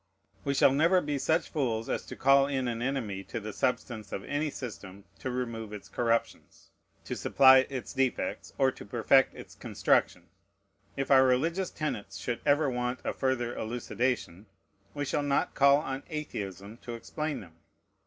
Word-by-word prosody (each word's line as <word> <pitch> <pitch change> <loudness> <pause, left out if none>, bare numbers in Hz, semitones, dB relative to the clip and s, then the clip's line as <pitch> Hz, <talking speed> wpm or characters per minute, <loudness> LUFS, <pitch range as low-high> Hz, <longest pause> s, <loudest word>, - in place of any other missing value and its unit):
We 140 - -1
shall 135 - +5
never 165 +7 +4
be 145 -4 -2
such 160 +5 +1
fools 115 -7 -1
as - - -3
to - - -7
call 135 +1 +5
in 135 -3 -1
an 115 -1 -3
enemy 120 -7 -2
to - - -5
the 105 -1 -7
substance 110 -4 -2
of 95 - -4
any 145 +2 -1
system 100 -7 -8 0.2
to 130 - -4
remove 115 -4 -4
its 105 -2 -9
corruptions, 115 -1 -2 0.3
to - - -4
supply 130 -1 +6
its 130 -3 -5
defects, 135 -2 -1
or 135 -1 +3
to - - -11
perfect 120 +5 +3
its - - -11
construction. - - 0 0.7
If 135 0 -2
our 135 -1 +8
religious 165 +9 +1
tenets 100 -10 -4
should 120 +5 -3
ever 145 +1 +4
want 125 0 -2
a - - -2
further 125 -3 -1
elucidation, 115 -3 -2 0.5
we 145 - -2
shall 145 - 0
not 145 -1 0
call 140 0 +6
on 135 -2 -4
Atheism 100 - -6
to 120 -1 -7
explain 150 +6 -4
them. 85 -4 -15
130 Hz, 165 wpm, -29 LUFS, 115-140 Hz, 0.7 s, our